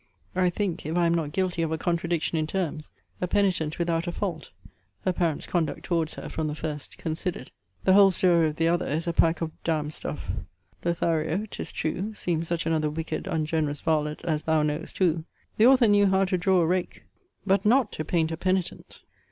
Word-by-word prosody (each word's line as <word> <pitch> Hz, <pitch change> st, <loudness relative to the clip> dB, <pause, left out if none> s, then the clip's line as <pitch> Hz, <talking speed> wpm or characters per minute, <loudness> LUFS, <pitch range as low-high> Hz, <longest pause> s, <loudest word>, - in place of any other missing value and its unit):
I 180 Hz, -1 st, +3 dB
think, 180 Hz, -1 st, -2 dB
if 160 Hz, +2 st, -1 dB
I 175 Hz, -, +3 dB
am 170 Hz, -, +3 dB
not 160 Hz, -3 st, -1 dB
guilty 185 Hz, -1 st, -1 dB
of 165 Hz, -1 st, 0 dB
a 160 Hz, -, 0 dB
contradiction 170 Hz, 0 st, -1 dB
in 155 Hz, -1 st, 0 dB
terms; 160 Hz, -4 st, -3 dB, 0.3 s
a 180 Hz, -, 0 dB
penitent 180 Hz, -6 st, +1 dB
without 170 Hz, 0 st, 0 dB
a -, -, 0 dB
fault; 170 Hz, -4 st, -4 dB, 0.6 s
her 185 Hz, -, +2 dB
parents' 170 Hz, -4 st, -1 dB
conduct 160 Hz, -5 st, -1 dB
towards 165 Hz, -3 st, -1 dB
her -, -, -7 dB
from 160 Hz, -1 st, -2 dB
the 150 Hz, -, -3 dB
first 150 Hz, -2 st, -5 dB
considered. 165 Hz, -3 st, -4 dB, 0.3 s
The 190 Hz, -, +5 dB
whole 200 Hz, 0 st, +8 dB
story 175 Hz, -3 st, +3 dB
of 150 Hz, -, -3 dB
the 165 Hz, +1 st, +1 dB
other 175 Hz, +1 st, +1 dB
is 160 Hz, +3 st, -1 dB
a 170 Hz, -, -1 dB
pack 165 Hz, +1 st, +2 dB
of 165 Hz, -1 st, -2 dB
d 160 Hz, -2 st, +1 dB
d 150 Hz, 0 st, -4 dB
stuff. -, -, -4 dB, 0.5 s
Lothario, 170 Hz, +2 st, 0 dB
'tis 220 Hz, -, -6 dB
true, 190 Hz, +7 st, -3 dB
seems 170 Hz, -4 st, -1 dB
such 170 Hz, -1 st, -1 dB
another 160 Hz, -2 st, +1 dB
wicked 160 Hz, +2 st, -4 dB
ungenerous 155 Hz, -3 st, -1 dB
varlet 155 Hz, -1 st, 0 dB
as 155 Hz, -3 st, 0 dB
thou 160 Hz, -1 st, +2 dB
knowest 150 Hz, +2 st, -3 dB
who: 170 Hz, -4 st, +2 dB, 0.3 s
the 220 Hz, -, +6 dB
author 255 Hz, -3 st, +6 dB
knew 205 Hz, -1 st, +5 dB
how 190 Hz, 0 st, +3 dB
to 185 Hz, 0 st, 0 dB
draw 185 Hz, 0 st, +3 dB
a -, -, +3 dB
rake; 180 Hz, +2 st, -1 dB, 0.4 s
but 195 Hz, 0 st, +3 dB
not 235 Hz, +1 st, +3 dB
to 155 Hz, -, -4 dB
paint 160 Hz, 0 st, 0 dB
a 160 Hz, -, -3 dB
penitent. 185 Hz, +1 st, -2 dB
170 Hz, 205 wpm, -26 LUFS, 160-185 Hz, 0.6 s, whole